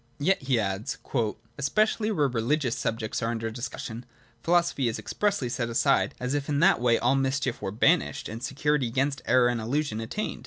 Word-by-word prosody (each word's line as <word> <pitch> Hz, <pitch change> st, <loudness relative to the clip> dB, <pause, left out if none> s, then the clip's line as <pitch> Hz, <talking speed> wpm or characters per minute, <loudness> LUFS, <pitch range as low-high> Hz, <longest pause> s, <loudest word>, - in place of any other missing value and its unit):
' 120 Hz, -, -37 dB
Yet,' 185 Hz, +7 st, +1 dB
he 130 Hz, -3 st, +1 dB
adds 95 Hz, 0 st, -2 dB
(p. -, -, -23 dB
vii), 110 Hz, -2 st, 0 dB
' 115 Hz, +1 st, -35 dB
especially 215 Hz, -, +1 dB
where 150 Hz, -10 st, +2 dB
reli 120 Hz, +4 st, +1 dB
gious 130 Hz, -7 st, -1 dB
subjects 115 Hz, 0 st, -2 dB
are 115 Hz, -, 0 dB
under 115 Hz, -1 st, -3 dB
discussion, 120 Hz, 0 st, -6 dB, 0.4 s
philosophy 170 Hz, -5 st, +2 dB
is 115 Hz, -, -1 dB
expressly 205 Hz, -11 st, -1 dB
set 120 Hz, -1 st, -2 dB
aside, 115 Hz, -, +2 dB
as 125 Hz, +2 st, -2 dB
if 145 Hz, 0 st, -2 dB
in 145 Hz, -, +1 dB
that 185 Hz, -4 st, +4 dB
way 120 Hz, -1 st, +4 dB
all 125 Hz, +2 st, +2 dB
mischief 135 Hz, -1 st, 0 dB
were -, -, -2 dB
banished 140 Hz, -, +2 dB
and 115 Hz, +2 st, -7 dB
security 140 Hz, 0 st, 0 dB
against 135 Hz, +3 st, -1 dB
error 125 Hz, 0 st, +5 dB
and 120 Hz, -2 st, 0 dB
illusion 120 Hz, -1 st, -1 dB
at 115 Hz, -, -6 dB
tained 215 Hz, -, -3 dB
130 Hz, 210 wpm, -27 LUFS, 115-145 Hz, 0.4 s, error